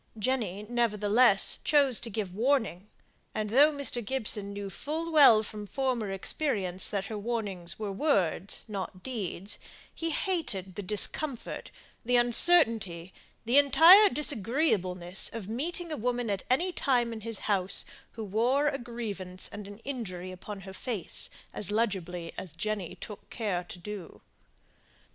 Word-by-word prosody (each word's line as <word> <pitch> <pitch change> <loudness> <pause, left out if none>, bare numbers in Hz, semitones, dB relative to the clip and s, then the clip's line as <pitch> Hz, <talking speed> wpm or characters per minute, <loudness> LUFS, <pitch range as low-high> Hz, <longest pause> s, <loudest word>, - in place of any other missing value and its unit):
Jenny, 210 -4 -1
nevertheless, 215 -2 +3
chose 280 -5 +3
to 235 - -5
give 200 -4 -3
warning; 225 -5 0 0.5
and 210 -1 -2
though 285 +6 +6
Mr. 280 -4 -2
Gibson 210 -4 -2
knew 200 0 -5
full 320 - -4
well 270 -9 +7
from 210 -1 -7
former 255 -4 -1
experience 195 - -1
that 200 -2 -2
her 210 +1 -5
warnings 200 -6 -3
were 210 -2 -4
words, 195 - +1
not 190 -3 -6
deeds, 205 -6 -5 0.3
he 330 - -3
hated 290 - -2
the 205 - -5
discomfort, 225 +7 -3 0.3
the 245 +1 +1
uncertainty, 230 - +3 0.3
the 245 +5 +6
entire 335 +9 +8
disagreeableness 205 - 0
of 225 -4 -6
meeting 325 +9 -4
a 305 - -3
woman 245 -1 -1
at 195 -2 -1
any 340 +9 +2
time 245 -7 +1
in 220 - -7
his 225 0 -4
house, 195 -3 0 0.3
who 225 - -6
wore 245 +8 +2
a 275 -1 -4
grievance 205 -7 -6
and 205 -1 -7
an 205 0 -10
injury 185 -9 -5
upon 195 +2 -8
her 190 0 -9
face 210 -2 -2 0.2
as 200 - 0
legibly 185 -6 -2
as 180 -5 -9
Jenny 200 +1 -3
took 210 -3 -10
care 200 -6 -2
to 180 - -9
do. 195 0 -8
215 Hz, 145 wpm, -29 LUFS, 195-260 Hz, 0.5 s, entire